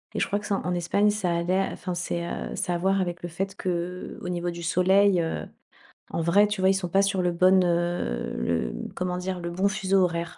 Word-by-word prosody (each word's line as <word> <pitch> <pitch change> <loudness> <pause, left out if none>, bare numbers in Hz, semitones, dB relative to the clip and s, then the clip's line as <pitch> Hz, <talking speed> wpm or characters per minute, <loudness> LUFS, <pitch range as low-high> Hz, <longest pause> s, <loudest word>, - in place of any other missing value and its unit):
Et - - 0
je - - +1
crois 205 - 0
que 205 - -10
c'est 205 - 0
en 180 -2 -2
Espagne 175 +4 +2
ça 200 -4 -1
allait, 180 +3 +1
enfin, 180 - -5
c'est, 175 -1 -2
heu, - - -5
c'est - - -2
à - - 0
voir 190 +3 +1
avec 175 -1 -3
le 175 - -4
fait 190 +3 -4
que, 185 - -3
heu, 180 +1 -4
au - - -6
niveau 175 0 -2
du 170 0 -8
soleil, 185 +2 +4
heu, 165 - -3 0.7
en - - -1
vrai, 195 +6 +4
tu 205 -2 -3
vois 190 - +5
ils - - +5
sont 190 -2 -2
pas 195 +3 +4
sur 195 -1 +1
le 175 - +2
bonne, 185 +2 +5
heu, 175 - -1
le 60 -2 -1 0.2
comment 180 -1 -2
dire? 180 0 -3
Le 170 - -3
bon 185 +3 +1
fuseau 195 -2 +1
horaire. 170 -1 -2
180 Hz, 250 wpm, -26 LUFS, 170-195 Hz, 0.7 s, vois